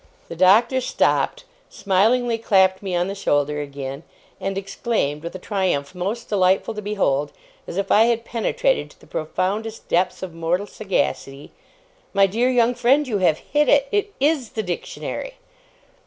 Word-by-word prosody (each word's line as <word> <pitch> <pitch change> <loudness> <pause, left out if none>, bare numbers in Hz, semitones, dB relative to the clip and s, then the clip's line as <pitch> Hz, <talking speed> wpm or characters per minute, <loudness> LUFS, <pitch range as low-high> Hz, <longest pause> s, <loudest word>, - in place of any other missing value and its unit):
The 170 - -6
Doctor 220 +9 +4
stopped, - - 0 0.3
smilingly 225 +4 +1
clapped 190 -4 +3
me 190 -3 -3
on 175 +1 +1
the 195 - -3
shoulder 150 -6 0
again, 140 -1 -6 0.4
and 195 0 -3
exclaimed, 195 -6 -2
with 170 +3 -7
a - - -3
triumph 185 -7 -1
most 195 +6 -4
delightful 190 +2 +2
to 210 - -6
behold, 150 -9 0 0.4
as - - -6
if 195 0 -1
I 220 +2 +6
had 235 -1 0
penetrated - - 0
to - - -21
the - - -18
profoundest 205 +8 -3
depths 180 +2 +1
of 180 -3 -6
mortal 165 +4 -1
sagacity, 145 -9 -3 0.6
'My 195 0 +6
dear 230 +6 +1
young 245 -1 +3
friend, 255 +4 +2
you 215 -5 -1
have 165 -4 +3
hit 295 0 0
it. 280 -1 +4
It 410 0 -1
IS 280 -4 +1
the 220 - -2
Dictionary! 200 - -5
195 Hz, 160 wpm, -22 LUFS, 175-235 Hz, 0.6 s, I